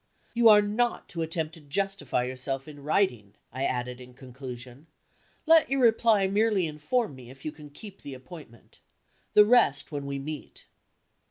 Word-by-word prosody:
"You 235 -1 +6
are 210 -1 +7
not 230 +4 -1
to 165 - -4
attempt 160 0 -3
to 165 - -11
justify 150 -4 -2
yourself 130 +2 -3
in 145 -2 -11
writing," 130 - 0 0.2
I 130 +2 -2
added 125 0 -3
in 125 0 -13
conclusion. 130 +1 -10 0.6
"Let 325 0 +5
your 270 0 +1
reply 225 -3 +4
merely 205 -1 +2
inform 160 - -1
me 125 -2 -12
if 135 +1 -14
you 155 - -2
can 150 -1 -13
keep 195 +7 -12
the 140 -2 -8
appointment. 130 -4 -14 0.6
The 210 - +8
rest, 210 - +3
when 140 -2 -4
we 140 0 -3
meet." 150 +1 -8
150 Hz, 165 wpm, -27 LUFS, 130-205 Hz, 0.6 s, The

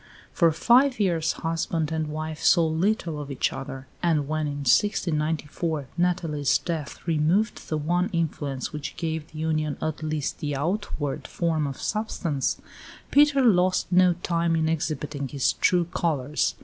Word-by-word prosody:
For 170 -2 +4
five 250 - +4
years 170 -5 +1
husband 165 -1 -2
and 160 -1 -1
wife 155 0 -5
saw 170 -3 +5
little 165 -1 0
of 145 - -8
each 135 - 0
other; 135 -1 -7 0.2
and 155 -5 +1
when, 155 0 -1
in 145 0 -4
1694, 155 -2 0
Nathalie's 165 -5 +1
death 160 -5 -5
removed 170 +6 +1
the 155 - 0
one 175 +5 0
influence 150 -6 -2
which 150 -1 -6
gave 160 -2 -3
the 155 - -11
union 155 -2 -1
at 155 0 -3
least 155 -2 -2
the 145 -1 -2
outward 145 -2 -2
form 160 -3 0
of 135 - -6
substance, 175 -10 -1 0.5
Peter 290 -2 +5
lost 185 -4 +3
no 180 0 +5
time 170 -1 +1
in 160 -1 +1
exhibiting 150 -3 -2
his 135 0 +1
true 175 -1 +2
colours. 150 -3 0
160 Hz, 150 wpm, -25 LUFS, 150-175 Hz, 0.5 s, saw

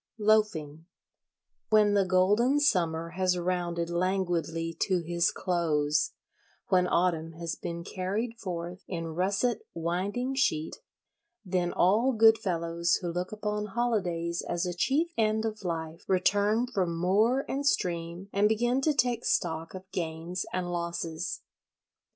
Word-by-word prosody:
Loafing 195 -8 +1 0.8
When 210 -2 +5
the 200 -1 +3
golden 205 +9 +3
Summer 165 - +1
has 180 +1 0
rounded 175 -1 -1
languidly 170 -2 -1
to 185 - +2
his 170 +1 +1
close, 155 -5 0 0.6
when 180 -1 +4
Autumn 165 -2 +1
has 165 0 -4
been 170 0 -5
carried 205 +7 -3
forth 175 -2 -5
in 165 -3 -4
russet 200 +6 +1 0.2
winding 190 +10 -2
sheet, 160 - 0 0.7
then 180 -1 0
all 220 +9 +3
good 225 0 +6
fellows 170 -2 0
who 175 - -1
look 180 +1 -3
upon 210 0 -3
holidays 175 -8 0
as 175 +1 -2
a 180 - -2
chief 275 - +1
end 220 0 +2
of 215 -2 -4
life 165 -2 -4
return 205 +5 +2
from 185 -9 -1
moor 215 +10 +2
and 280 +1 -1
stream 170 -3 -1
and 205 +1 +3
begin 240 +4 +1
to 300 +1 +2
take 245 -2 +1
stock 165 0 -1
of 185 - -7
gains 165 +1 -3
and 180 -1 -2
losses. 170 -2 -3
180 Hz, 135 wpm, -29 LUFS, 170-215 Hz, 0.8 s, good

